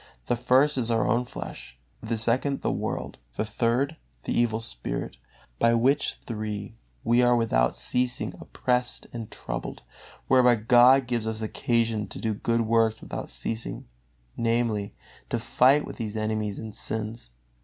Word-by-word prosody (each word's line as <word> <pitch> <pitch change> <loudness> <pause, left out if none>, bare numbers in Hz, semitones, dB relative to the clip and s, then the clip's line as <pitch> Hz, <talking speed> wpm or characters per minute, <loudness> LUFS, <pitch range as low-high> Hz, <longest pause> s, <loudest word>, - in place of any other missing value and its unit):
The 120 - +1
first 130 +4 +3
is 120 -2 +1
our 115 -2 +2
own 120 +2 +2
flesh, - - -8 0.2
the 115 0 -2
second 125 +5 +1
the - - 0
world, - - -4 0.2
the - - 0
third 120 +8 0 0.3
the - - -2
evil 115 -2 +2
spirit, - - -4 0.4
by 115 0 +4
which 130 +5 +2
three 105 -2 -4 0.3
we 120 +1 +4
are 120 0 +5
without 85 - +2
ceasing 125 0 -1
oppressed 125 0 -1
and 115 -2 -6
troubled; - - -6 0.4
whereby 125 -2 +6
God 125 +4 +6
gives 120 -2 -2
us 110 0 -3
occasion 115 -1 0
to - - -8
do 110 -1 -1
good 115 +3 0
works 115 0 +2
without - - -6
ceasing, 110 - -4 0.5
namely, 115 -3 0 0.3
to - - 0
fight 135 +4 +4
with - - -8
these 110 -2 -4
enemies 110 -1 -1
and 110 -1 -7
sins. 110 - -4
115 Hz, 150 wpm, -26 LUFS, 110-120 Hz, 0.5 s, whereby